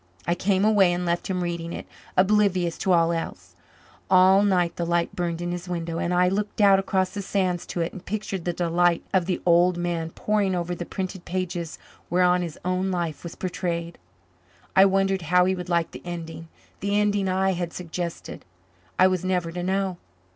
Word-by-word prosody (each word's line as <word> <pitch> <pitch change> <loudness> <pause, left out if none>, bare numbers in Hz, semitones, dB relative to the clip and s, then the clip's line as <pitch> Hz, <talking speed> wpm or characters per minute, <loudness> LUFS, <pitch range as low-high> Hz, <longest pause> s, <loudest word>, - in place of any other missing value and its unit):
I 170 - +2
came 190 +2 +1
away 205 -4 +5
and 180 0 -2
left 170 0 -1
him 180 -2 -1
reading 170 -1 -3
it, - - -6 0.3
oblivious 185 -3 +3
to 190 - 0
all 170 -1 +4
else. 165 -1 -5 0.5
All 190 +1 +6
night 180 -4 +2
the 175 - -2
light 170 0 0
burned 175 -1 -2
in 175 - -2
his 175 +1 -5
window, 165 -1 -3
and 170 - -1
I 180 0 +3
looked 205 +4 -2
out 200 -2 +6
across 190 -1 0
the 205 - -4
sands 185 -3 -1
to 175 - -3
it 165 - -2
and 185 - -9
pictured 200 -3 -4
the 175 - +1
delight 175 0 +1
of 185 -2 +2
the 180 - 0
old 175 +1 +4
man 170 -2 -2
poring 200 +1 0
over 175 0 -2
the 175 0 -6
printed 190 -2 -5
pages 175 -2 -3 0.3
whereon 180 +1 +3
his 170 -3 -5
own 185 +1 0
life 170 -4 -2
was 170 - -8
portrayed. 170 -2 -3 0.8
I 190 - +8
wondered 195 -1 +2
how 180 0 +5
he 190 - +2
would 180 -1 -6
like 170 -1 +1
the - - -9
ending 165 -2 -7 0.3
the 200 +1 0
ending 205 -2 +1
I 190 +1 +2
had 175 -2 -3
suggested. 170 -1 -6 0.5
I 185 - +6
was 185 -1 +1
never 180 -3 0
to 175 +1 -4
know. 190 0 -1
180 Hz, 195 wpm, -25 LUFS, 170-190 Hz, 0.8 s, I